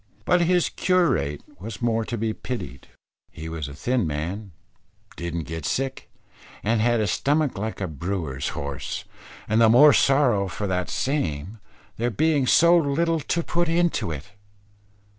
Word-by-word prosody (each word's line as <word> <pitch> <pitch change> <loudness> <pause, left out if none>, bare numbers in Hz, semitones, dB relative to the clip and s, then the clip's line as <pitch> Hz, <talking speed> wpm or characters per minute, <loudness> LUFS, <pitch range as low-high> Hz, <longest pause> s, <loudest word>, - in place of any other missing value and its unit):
But 180 -1 +3
his 175 0 +3
curate 165 - +1 0.2
was 105 +3 -7
more 115 -2 +1
to 120 - -4
be 110 0 -1
pitied, 65 - -6 0.4
he 80 - -8
was 80 -3 -4
a 70 - -9
thin 120 - 0
man, 90 +7 -4 0.6
didn't 85 -1 -4
get 80 +1 -6
sick, 135 - -2 0.5
and 110 +1 +1
had 120 0 +2
a 110 - +1
stomach 145 +5 +1
like 110 +2 -4
a 95 - -2
brewer's 80 -3 -3
horse; 70 -1 -5 0.4
and 110 +2 +2
the 115 - +6
more 145 +6 +8
sorrow 130 -8 +3
for 95 +4 -4
that 90 -2 -1
same, 105 - -2 0.4
there 120 +2 0
being 145 +4 +1
so 170 +5 +6
little 165 +1 +2
to 170 +3 -1
put 175 0 0
into 170 - +1
it. 75 +2 -7
110 Hz, 155 wpm, -24 LUFS, -, 0.6 s, more